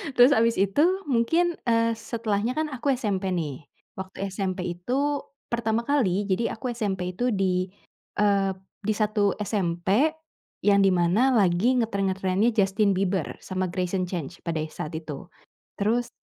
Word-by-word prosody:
Terus 245 +1 +8
habis 230 +1 +3
itu 195 +8 +2 0.3
mungkin, 325 +9 +2
eee, 230 -1 +3
setelahnya 225 0 -2
kan 310 0 +1
aku 270 0 0
SMP 200 -7 -1
nih, 150 -5 -4 0.3
waktu 190 +1 -5
SMP 185 -2 -3
itu 280 +9 -1 0.3
pertama 230 -1 0
kali, 205 -9 +1
jadi 195 +5 0
aku 250 +3 -4
SMP 190 -5 -2
itu 245 0 +1
di, 185 -2 +1 0.5
eee, 200 -2 +3 0.3
di 215 - +2
satu 210 -1 +1
SMP 200 - +1 0.5
yang 200 0 +4
di 195 - +5
mana 185 +10 +3
lagi 210 +4 +3
ngetren-ngetrennya 195 0 +1
Justin 200 -1 +2
Bieber 190 -3 0 0.2
sama 185 -1 -2
Greyson 185 +1 -1
Chance 170 -2 -5
pada 165 -2 -1
e 155 - -4
saat 155 +1 -6
itu. 155 -1 -6 0.5
Terus 230 +4 +1
200 Hz, 145 wpm, -26 LUFS, 185-230 Hz, 0.5 s, Terus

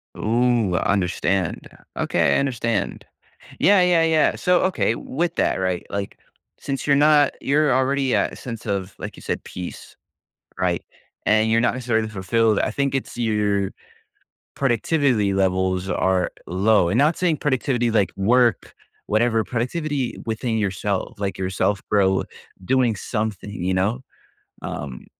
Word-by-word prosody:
Ooh, 115 -4 +1
I 85 - +1
understand. 95 -1 -1 0.3
Okay, 70 - +2
I - - +3
understand, 115 -6 -2 0.5
yeah, 200 -1 +5
yeah, 175 -2 +4
yeah, 160 -1 +3
so 180 -1 +2
okay, 185 -11 +1
with 170 +8 -3
that, - - +1
right? 95 -2 -1
Like, 100 -1 -4 0.4
since 135 0 -4
you're 140 - +5
not 145 0 +4
you're 145 0 +2
already 130 0 +1
at - - 0
a - - -7
sense 115 -3 -8
of, 100 -2 -3
like - - -6
you - - -12
said, - - -3
peace, 90 -1 -8 0.6
right? 90 -2 0 0.4
And 110 +1 +3
you're 115 +1 +3
not 120 - +2
necessarily 115 -3 0
fulfilled. 110 +2 +1
I - - 0
think 140 +3 -1
it's 135 - -4
your 105 -4 0 0.9
productivity 120 -5 +1
levels 95 -1 0
are 95 0 +1 0.2
low, 95 +1 +2
and 100 +7 +1
not 150 +4 +3
saying 170 -4 +1
productivity 130 -3 0
like 105 -3 +2
work, 120 +2 +2 0.3
whatever, 110 +1 +2
productivity 135 +2 -2
within 110 +1 -2
yourself, 100 0 -2
like, 100 -1 -2
yourself, 95 +2 -1
bro, 95 -2 +2 0.4
doing 125 0 +2
something, 105 -1 -3
you 95 -2 -2
know, 100 +7 0 0.6
um, 65 -3 -6
110 Hz, 145 wpm, -22 LUFS, 95-130 Hz, 0.9 s, yeah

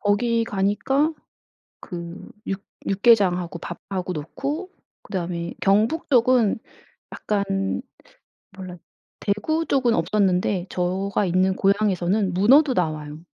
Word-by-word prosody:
거기 230 +3 +1
가니까 225 +10 +1 0.7
그 170 -1 -8 0.2
육 195 0 -3 0.3
육개장하고 190 -4 +3
밥하고 185 +2 -5
놓고 280 - -4 0.3
그다음에 170 -3 -4
경북쪽은 235 +1 +3 0.6
약간 195 -2 -1 0.8
몰라 185 -2 -8 0.4
대구 315 +11 0
쪽은 255 -6 +2
없었는데 190 -3 +1
저가 190 +3 -1
있는 185 +1 +2
고향에서는 195 -1 +1
문어도 260 - +5
나와요. 155 -5 -2
195 Hz, 235 characters per minute, -23 LUFS, 180-230 Hz, 0.8 s, 문어도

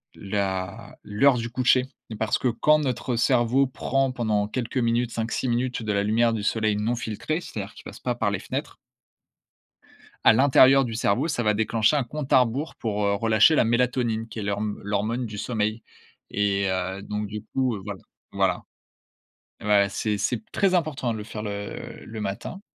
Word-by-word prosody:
la 95 +1 -3
l'heure 125 +7 +3
du 115 0 -3
coucher, 130 +1 +3 0.2
et 110 - -6
parce 110 +1 0
que - - 0
quand 150 +6 +3
notre 125 -3 -2
cerveau 125 +2 +3
prend 135 +1 0
pendant 110 -5 0
quelques 120 +3 -4
minutes, 120 -1 +1
5-6 115 +3 -2
minutes 120 0 -1
de 105 -1 -1
la 100 - +1
lumière 115 +3 +2
du 105 -2 -3
soleil 110 -1 +1
non 110 +3 0
filtré. 115 - -3
C'est-à-dire 100 - -7
qui - - -14
passe - - -10
pas - - -2
par - - 0
les - - -2
fenêtres - - -5 1.5
à - - +8
l'intérieur 135 +2 +6
du 115 - -5
cerveau, 115 +7 +1
ça 145 - -1
va 105 -2 +2
déclencher 110 +4 +2
un 145 - +2
compte 140 +3 -6
à 130 - +7
rebours 130 +6 -2
pour, 105 -2 -2
heu, 100 - +2
relâcher 110 +7 +4
la - - +4
mélatonine 120 -1 0
qui 115 - -11
est - - -3
l'horm 105 +1 -2
l'hormone 105 +5 -1
du 105 -2 -6
sommeil 110 -1 -1 0.5
et 100 -1 +1
heu, 95 +1 -2
donc 105 +1 -4
du 105 0 -6
coup 120 -3 -1
voilà. 100 -1 -7 0.3
Voilà. - - +1 1.0
Ouais, 105 -1 +4
c'est 105 +1 -1
c'est 120 +5 0
p 110 - -17
très 195 -2 +2
important 155 -8 0
de 110 - -3
le 105 - -6
faire 105 0 -6
le 100 -1 -6
le 110 -1 -7
matin. 100 - -5
115 Hz, 185 wpm, -25 LUFS, 105-125 Hz, 1.5 s, à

